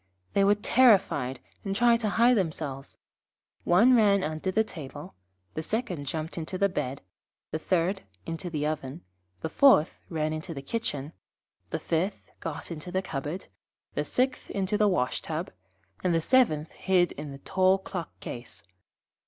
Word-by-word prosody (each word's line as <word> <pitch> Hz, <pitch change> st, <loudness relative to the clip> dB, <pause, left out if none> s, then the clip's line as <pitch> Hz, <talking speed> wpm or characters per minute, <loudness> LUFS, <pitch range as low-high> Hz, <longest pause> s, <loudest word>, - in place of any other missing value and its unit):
They 200 Hz, -, +4 dB
were 200 Hz, +1 st, +5 dB
terrified, 195 Hz, -, +3 dB, 0.2 s
and 195 Hz, -1 st, -2 dB
tried 235 Hz, +1 st, +4 dB
to 215 Hz, -3 st, 0 dB
hide 235 Hz, +4 st, +5 dB
themselves. 155 Hz, -, -3 dB, 0.7 s
One 225 Hz, +9 st, +6 dB
ran 200 Hz, -4 st, +4 dB
under 155 Hz, +4 st, -2 dB
the 220 Hz, +4 st, +3 dB
table, 145 Hz, -7 st, -9 dB, 0.4 s
the 160 Hz, -, -3 dB
second 180 Hz, -, -3 dB
jumped 160 Hz, +4 st, -3 dB
into 165 Hz, +3 st, -4 dB
bed, 140 Hz, -7 st, -3 dB, 0.5 s
the 155 Hz, -, -2 dB
third 180 Hz, +3 st, +1 dB, 0.2 s
into 165 Hz, +2 st, -4 dB
the 150 Hz, -3 st, -2 dB
oven, 150 Hz, 0 st, -3 dB, 0.4 s
the 160 Hz, -, -2 dB
fourth 190 Hz, -, +5 dB
ran 155 Hz, -2 st, -1 dB
into 155 Hz, +2 st, -5 dB
the 140 Hz, -, -6 dB
kitchen, 150 Hz, -6 st, -3 dB, 0.6 s
the -, -, -1 dB
fifth 180 Hz, +5 st, -2 dB
got 165 Hz, +1 st, -6 dB
into 165 Hz, +2 st, -6 dB
the 190 Hz, +1 st, 0 dB
cupboard, 150 Hz, +2 st, -4 dB, 0.5 s
the -, -, 0 dB
sixth 255 Hz, +1 st, 0 dB
into 195 Hz, +1 st, -1 dB
the 210 Hz, 0 st, +4 dB
wash 155 Hz, -10 st, +1 dB
tub, 160 Hz, +2 st, -4 dB, 0.5 s
and 175 Hz, -2 st, +2 dB
the -, -, +4 dB
seventh 160 Hz, -, +3 dB
hid 180 Hz, -2 st, +2 dB
in 150 Hz, -, -7 dB
the 135 Hz, -, -8 dB
tall 185 Hz, +6 st, +3 dB
clock 185 Hz, -3 st, -7 dB
case. 120 Hz, 0 st, -8 dB
175 Hz, 155 wpm, -28 LUFS, 155-200 Hz, 0.7 s, One